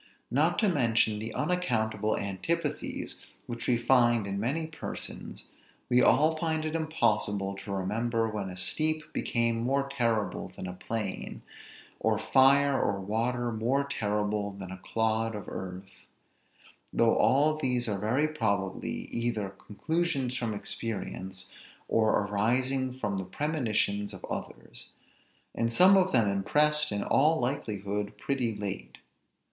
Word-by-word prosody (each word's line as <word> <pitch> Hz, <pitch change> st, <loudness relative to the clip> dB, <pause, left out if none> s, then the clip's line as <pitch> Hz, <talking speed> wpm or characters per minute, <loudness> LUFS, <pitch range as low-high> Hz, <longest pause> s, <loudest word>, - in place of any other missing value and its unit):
Not 155 Hz, +7 st, +2 dB
to 215 Hz, -, +3 dB
mention 115 Hz, -, +2 dB
the 110 Hz, +2 st, -4 dB
unaccountable 110 Hz, -, 0 dB
antipathies 100 Hz, -, -3 dB, 0.3 s
which 120 Hz, -1 st, -5 dB
we 125 Hz, -, +3 dB
find 120 Hz, -2 st, +4 dB
in 100 Hz, 0 st, -3 dB
many 140 Hz, +9 st, -1 dB
persons, 160 Hz, 0 st, -6 dB, 0.4 s
we 125 Hz, 0 st, +5 dB
all 155 Hz, +5 st, +4 dB
find 160 Hz, -1 st, -1 dB
it 155 Hz, -, -2 dB
impossible 105 Hz, -11 st, 0 dB
to 100 Hz, +1 st, -7 dB
remember 115 Hz, +4 st, 0 dB
when 105 Hz, -3 st, -3 dB
a 90 Hz, -, -8 dB
steep 155 Hz, +10 st, 0 dB
became 115 Hz, -1 st, +1 dB
more 135 Hz, +3 st, +1 dB
terrible 115 Hz, -6 st, -1 dB
than -, -, -6 dB
a 90 Hz, -, -5 dB
plain; 105 Hz, +1 st, -4 dB, 0.6 s
or -, -, +2 dB
fire 140 Hz, +1 st, +4 dB
or 100 Hz, -1 st, 0 dB
water 120 Hz, +5 st, -1 dB
more 120 Hz, +6 st, +1 dB
terrible 105 Hz, -5 st, -1 dB
than 95 Hz, -2 st, -8 dB
a 95 Hz, -, -7 dB
clod 110 Hz, +2 st, 0 dB
of 105 Hz, -, -7 dB
earth; 95 Hz, +1 st, -6 dB, 1.0 s
though 115 Hz, -1 st, +3 dB
all 150 Hz, +3 st, +3 dB
these 125 Hz, -4 st, 0 dB
are 100 Hz, -2 st, -1 dB
very 125 Hz, +9 st, +2 dB
probably 100 Hz, -10 st, -1 dB
either 115 Hz, -4 st, -1 dB
conclusions 135 Hz, -, -2 dB
from 115 Hz, -4 st, -2 dB
experience, 95 Hz, -3 st, -4 dB, 0.4 s
or 110 Hz, -1 st, +3 dB
arising 125 Hz, +6 st, +1 dB
from 105 Hz, -6 st, -2 dB
the 95 Hz, -, -4 dB
premonitions 110 Hz, -, -1 dB
of -, -, -8 dB
others; -, -, -6 dB, 0.6 s
and 115 Hz, 0 st, 0 dB
some 185 Hz, +10 st, +7 dB
of 190 Hz, -1 st, +4 dB
them 115 Hz, -5 st, +4 dB
impressed, 150 Hz, +10 st, +2 dB
in 100 Hz, -1 st, -1 dB
all 155 Hz, +4 st, +3 dB
likelihood, 105 Hz, -5 st, -2 dB
pretty 125 Hz, -3 st, -1 dB
late. 95 Hz, -13 st, -5 dB
115 Hz, 135 wpm, -29 LUFS, 105-140 Hz, 1.0 s, some